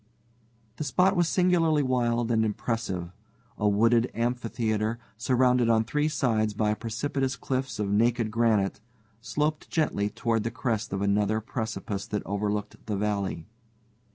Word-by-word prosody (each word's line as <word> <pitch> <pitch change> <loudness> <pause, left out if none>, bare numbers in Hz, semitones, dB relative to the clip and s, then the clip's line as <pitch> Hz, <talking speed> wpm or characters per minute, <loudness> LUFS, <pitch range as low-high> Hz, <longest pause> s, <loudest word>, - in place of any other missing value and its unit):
The - - -2
spot 180 +7 +3
was 175 -2 +3
singularly 165 -5 +3
wild 120 -2 +1
and 110 -1 +3
impressive. 105 -5 -2 0.5
A 105 - +3
wooded 115 +4 +3
amphitheater, 115 -2 -1 0.2
surrounded 125 0 +2
on 110 -1 +4
three 150 +6 0
sides 110 -8 0
by 105 0 +1
precipitous 130 +4 -2
cliffs 130 -1 -3
of 105 -1 -1
naked 115 +1 +2
granite, 110 -4 +1 0.4
sloped 150 +5 -2
gently 125 -10 0
toward 115 +1 0
the 115 - -2
crest 115 -3 -2
of 100 0 -1
another 105 +2 +2
precipice 110 -3 -4
that 105 -1 -3
overlooked 105 +1 -3
the 105 -2 -1
valley. 100 -5 -2
115 Hz, 135 wpm, -27 LUFS, 105-130 Hz, 0.5 s, on